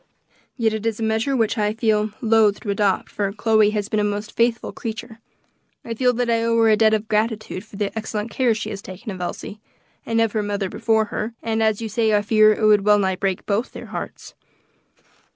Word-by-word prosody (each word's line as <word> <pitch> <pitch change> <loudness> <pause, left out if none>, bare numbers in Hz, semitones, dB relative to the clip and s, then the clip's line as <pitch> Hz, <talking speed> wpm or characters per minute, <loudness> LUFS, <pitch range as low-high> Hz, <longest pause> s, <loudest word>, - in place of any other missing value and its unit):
Yet 225 -3 +1
it 220 +1 -2
is 225 -1 -2
a - - -2
measure 225 +4 0 0.2
I 210 +1 0
feel 215 -2 +1
loth 220 -3 +3
to 205 - -2
adopt, 200 -2 +1
for 200 -1 -2
Chloe 215 0 +3
has 210 -1 -2
been 215 -1 -1
a - - +1
most 205 +1 -2
faithful 235 0 0
creature. 225 0 -7 0.7
I 230 - -4
feel 250 +2 +2
that 245 0 -1
I 230 -1 +1
owe 230 0 +1
her 225 -1 +4
a 215 - +6
debt 220 0 +4
of 215 0 -4
gratitude 215 -2 -1
for 220 - -15
the 200 +1 -3
excellent 220 0 -4
care 240 -1 +2
she 215 0 -4
has 200 -2 -6
taken 200 +4 -8
of 185 -2 -7
Elsie, 200 +3 -5 0.4
and 230 0 0
of 225 -1 +2
her 215 - -1
mother 205 -2 -2
before 220 -1 +1
her, 225 +2 -3
and 225 -1 -1
as 220 0 +1
you - - -2
say, 220 0 +1
I 205 - +2
fear 215 0 +5
it 215 0 0
would 210 -2 +5
wellnigh 200 -2 +3
break 190 -1 -2
both 215 +4 -1
their - - -8
hearts. - - -7
215 Hz, 220 wpm, -22 LUFS, 205-225 Hz, 0.7 s, a